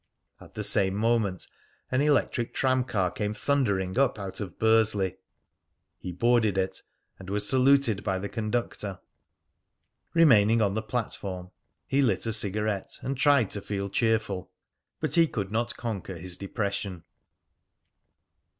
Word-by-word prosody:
At - - -16
the - - -3
same 95 -1 +4
moment 110 -4 0 0.5
an 130 +1 +2
electric 145 -5 +1
tram 130 -1 +2
car 95 -8 0
came 105 0 -3
thundering 105 -8 0
up 135 -3 +2
out 95 -2 -6
of 95 -6 -6
Bursley. 110 -4 +2 0.8
He 90 - -6
boarded 110 +1 +2
it, 95 0 -1 0.4
and 95 0 -10
was 105 +1 -1
saluted 130 -4 +4
by 95 -3 -1
the 100 +2 -4
conductor. 110 -3 -3 1.2
Remaining 115 -9 +5
on 100 -3 +2
the 110 - -1
platform, 100 -5 -4 0.3
he 140 +1 +1
lit 125 -3 +1
a 115 - +1
cigarette, 105 -1 0
and 135 - -2
tried 140 -5 +3
to 100 - -1
feel 100 0 -4
cheerful; 110 -5 0 0.5
but 155 -3 -2
he 165 0 +5
could 100 -8 -4
not 115 +2 -2
conquer 100 -6 -5
his 90 +1 -5
depression. 100 -2 -4
105 Hz, 140 wpm, -27 LUFS, 95-120 Hz, 1.2 s, Remaining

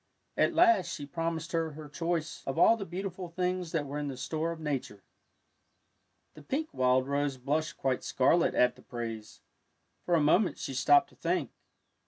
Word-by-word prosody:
At 340 - +2
last 345 - +5
she 145 -4 -5
promised 165 +2 -3
her 165 -2 -1
her 155 0 -9
choice 165 +1 -3
of 135 - -2
all 200 +6 +6
the 200 -4 -6
beautiful 185 0 -5
things 180 0 -2
that 155 -4 -1
were 145 +1 -4
in 145 - -3
the 135 -2 -5
store 155 +6 -2
of 165 - -7
Nature. 135 - -4 1.3
The 155 - -13
pink 295 - -2
wild 130 0 +2
rose 140 -1 -1
blushed 150 +5 -2
quite 130 -2 -1
scarlet 165 +6 +2
at 125 0 +3
the 125 - -17
praise. 115 -3 -7 0.6
For 175 - +2
a - - +4
moment 175 +7 +3
she 135 - -5
stopped 145 +2 +4
to - - -22
think. - - -1
155 Hz, 180 wpm, -30 LUFS, 135-175 Hz, 1.3 s, all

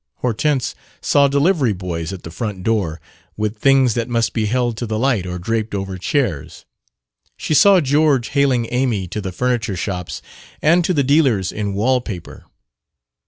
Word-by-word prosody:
Hortense 125 +3 0 0.3
saw 140 -1 +3
delivery 140 - +2
boys 85 -3 -4
at 95 -2 -8
the 80 - -8
front 100 -1 -5
door, 95 -8 0 0.4
with 105 +1 -2
things 135 -2 +4
that 120 +2 -2
must 115 -1 0
be 110 -2 0
held 120 +1 0
to 120 - -4
the 110 0 -2
light 115 -6 +1
or 90 0 -4
draped 110 +3 -2
over 95 -1 -4
chairs. 85 - -2 0.7
She - - -2
saw 195 +5 +6
George 145 -3 +2
haling 135 -5 +1
Amy 120 -7 0
to 105 - -4
the 95 -1 -4
furniture 115 0 -1
shops 90 -3 -4 0.4
and 170 +3 +3
to 180 - 0
the 140 - +2
dealers 130 - +2
in 100 -2 -3
wall 125 +5 +2
paper. 100 -8 -8
115 Hz, 165 wpm, -19 LUFS, 95-135 Hz, 0.7 s, saw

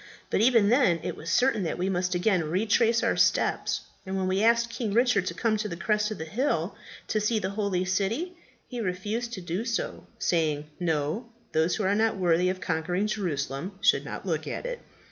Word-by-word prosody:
But - - +2
even 230 -3 +5
then 230 -9 +4
it - - -3
was 165 - -7
certain 245 +3 +3
that 170 - -2
we 180 +2 -1
must 180 -1 0
again 175 -2 +2
retrace 225 +5 +2
our - - +2
steps; - - +2 0.2
and 190 0 -3
when 190 -1 0
we 190 +1 +1
asked 235 +1 +3
King 230 -3 -3
Richard 230 -5 +3
to 170 - -3
come 220 +1 +1
to 210 0 -3
the 170 - -4
crest 210 +2 +1
of 215 - -5
the 160 - -5
hill 245 - -1 0.3
to 215 - +1
see 220 +2 +1
the 195 -2 -2
holy 200 -3 -1
city, 210 - -1 0.3
he 245 -2 -5
refused 210 +5 -2
to 190 - -5
do 175 +4 -3
so, 230 -1 -3
saying, 155 -4 0
'No; 165 - -1 0.2
those 160 +2 +2
who 215 - -2
are 190 +1 +2
not 220 0 +2
worthy 180 -1 +3
of 185 0 -2
conquering 180 +3 -1
Jerusalem 180 -3 -3
should 200 - +3
not - - -7
look - - -2
at - - -4
it!' - - -4
200 Hz, 205 wpm, -27 LUFS, 180-225 Hz, 0.3 s, even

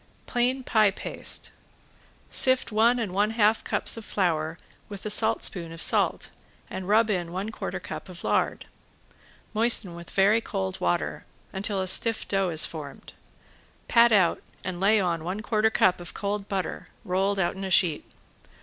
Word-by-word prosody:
~PLAIN 255 +2 -1
PIE 215 -4 +3
PASTE~ 195 - -3 0.8
Sift 260 -2 +3
one 230 +3 +3
and 215 -6 -3
one 205 +2 +1
half 220 -1 +2
cups - - +3
of 225 - -7
flour 165 -5 -1 0.3
with 200 -1 -9
a 215 - -2
saltspoon 200 -6 +1
of 165 - -9
salt - - +2 0.4
and 185 -1 -6
rub 215 +2 +3
in 175 -4 -2
one 195 +5 -4
quarter - - -5
cup - - -8
of - - -9
lard. - - -1 0.9
Moisten 220 -4 +3
with 170 0 -11
very 205 +4 +3
cold 95 - -4
water 85 0 -1 0.3
until 195 0 0
a - - -4
stiff 225 +4 +3
dough 195 -2 0
is 160 -2 +2
formed. 150 -4 -9 0.7
Pat 235 0 +5
out 190 -6 +3 0.2
and 180 -2 -5
lay 210 +3 +3
on 170 -4 -1
one 185 +5 -4
quarter 215 0 +1
cup 185 -4 +2
of 175 - -9
cold 200 0 -3
butter 190 -2 -4 0.2
rolled 195 +1 0
out 185 -1 0
in 195 - -7
a 190 - -3
sheet. 175 -4 +2
195 Hz, 165 wpm, -26 LUFS, 180-220 Hz, 0.9 s, Pat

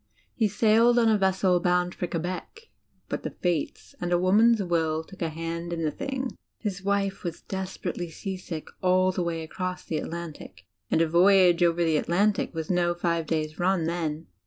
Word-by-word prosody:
He 220 - +2
sailed 225 +4 +4
on 230 -2 +5
a 215 - +4
vessel 190 -1 +2
bound 180 0 +1
for 180 - -3
Quebec; 180 - -5 0.4
but - - -3
the - - -4
fates 175 -5 -3
and 175 0 -2
a 175 - +4
woman's 210 +5 +4
will 160 -3 0
took 190 +3 -15
a 165 - 0
hand 165 +2 -5
in 165 -1 -2
the 155 - +1
thing. 265 - -3 0.3
His 195 -4 -4
wife 200 -1 0
was 170 -3 -5
desper 190 -2 -4
ately 175 -2 -5
seasick 185 -3 -6
all 185 0 +3
the 185 - -2
way 170 -2 -2
across 180 +3 -5
the 155 - -2
Atlantic 160 - -7 0.2
and 160 - +2
a - - +1
voyage 180 +1 +5
over 170 0 +3
the 160 -2 +2
Adantic 200 +4 +1
was 160 +1 -3
no 175 -1 +2
five 170 -2 -1
days' 155 -1 -2
run 180 -1 +2
then. 165 -1 -2
175 Hz, 185 wpm, -26 LUFS, 165-190 Hz, 0.4 s, on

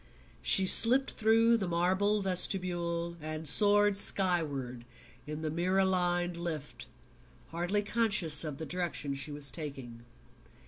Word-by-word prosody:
She 190 - +4
slipped 255 +7 +5
through 225 +1 +2
the 195 -4 -4
marble 190 +4 0
vestibule 175 -2 -1
and 155 0 -6
soared 205 +4 +3
skyward 150 -12 +1 0.4
in 150 +1 -7
the 155 - -3
mirror 185 +4 0
lined 175 -2 -1
lift, 150 -8 -7 0.6
hardly 175 +5 -2
conscious 200 -9 0
of 150 -3 -6
the 160 - -7
direction 160 -4 -4
she 140 +2 -3
was 145 -2 -4
taking. 135 -7 -8
175 Hz, 125 wpm, -30 LUFS, 150-195 Hz, 0.6 s, slipped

